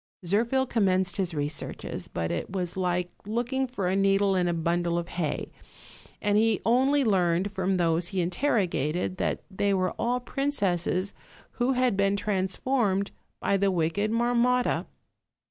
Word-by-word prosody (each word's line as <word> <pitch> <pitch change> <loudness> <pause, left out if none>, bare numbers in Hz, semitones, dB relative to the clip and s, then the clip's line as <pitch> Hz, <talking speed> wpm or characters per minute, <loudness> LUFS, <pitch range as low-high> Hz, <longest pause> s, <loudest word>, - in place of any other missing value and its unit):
Zirphl 235 +8 +1
commenced 190 -5 +1
his 185 -4 -1
researches; 145 0 -4
but 85 0 -3
it 85 - -3
was 180 -3 -2
like 180 -1 -1 0.2
look 240 +4 -2
ing 265 0 +1
for 220 -7 -3
a 185 - +1
needle 195 0 +3
in 180 -1 +2
a - - +2
bundle 170 +1 0
of 170 0 -3
hay, 165 -4 -3 0.7
and 205 0 +2
he 220 -2 +2
only 265 +5 +3
learned 185 -3 +2
from 190 -1 0
those 170 0 +1
he 190 +1 -2
interrogated 180 - 0
that - - -1
they 200 +1 +1
were 185 -1 +1
all 245 +2 +1
princesses 200 - -1 0.4
who 250 +2 0
had 250 -4 +2
been 200 0 +2
transformed 200 +1 0 0.3
by 200 - +1
the 195 0 +2
wicked 180 +4 0
Marmotta. 245 +2 +2
195 Hz, 150 wpm, -27 LUFS, 175-230 Hz, 0.7 s, needle